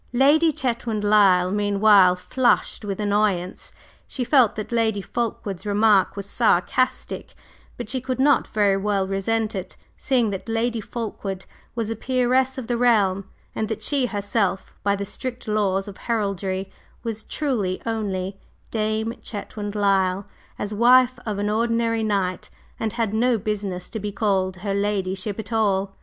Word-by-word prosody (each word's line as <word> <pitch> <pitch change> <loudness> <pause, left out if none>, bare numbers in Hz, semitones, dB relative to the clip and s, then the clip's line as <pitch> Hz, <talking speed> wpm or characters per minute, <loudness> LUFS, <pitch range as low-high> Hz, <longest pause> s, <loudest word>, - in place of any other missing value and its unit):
Lady 295 +6 +5
Chetwynd 235 -5 -2
Lyle 195 -3 +4
meanwhile 205 -2 +5
flushed 240 +5 +1
with 200 -1 -4
annoyance; 205 -3 0 0.4
she 255 - -3
felt 250 -3 +4
that 215 +1 -5
Lady 225 -3 +1
Fulkeward's 200 -3 -3
remark 205 -1 +3
was 200 -1 -5
sarcastic, 235 +4 0 0.4
but - - -5
she 260 - -3
could 260 0 -3
not 285 +1 +4
very 205 -2 +2
well 195 -1 0
resent 215 +3 -1
it, 190 -3 -6 0.2
seeing 245 -5 +1
that 195 +3 -6
Lady 230 0 0
Fulkeward 205 -4 -5 0.3
was 225 -2 -2
a - - -2
peeress 255 +2 +1
of 260 - -4
the 240 +1 -1
realm, 200 -6 +2 0.2
and 220 - -2
that 220 -1 -4
she 275 0 +1
herself, 200 -3 -1
by 200 0 +1
the 200 0 -4
strict 245 +4 -6
laws 200 -2 0
of 200 - -9
heraldry, 195 -4 -2 0.3
was 225 -2 -4
truly 225 -11 -2
only 195 -4 -3 0.3
"Dame" 220 +1 -1
Chetwynd 205 -1 -6
Lyle, 195 -1 +2 0.3
as 205 +1 -4
wife 250 +3 +5
of 210 -2 -2
an 205 +1 -1
ordinary 230 0 +1
knight, 195 -4 -1 0.3
and 220 -2 -2
had 230 -3 -1
no 240 +2 +2
business 200 -4 -3
to 220 - -4
be 205 0 -4
called 195 -3 0
"her 200 - 0
ladyship" 200 0 -1
at 220 +1 -6
all. 195 -3 +1
210 Hz, 150 wpm, -23 LUFS, 195-230 Hz, 0.4 s, Lady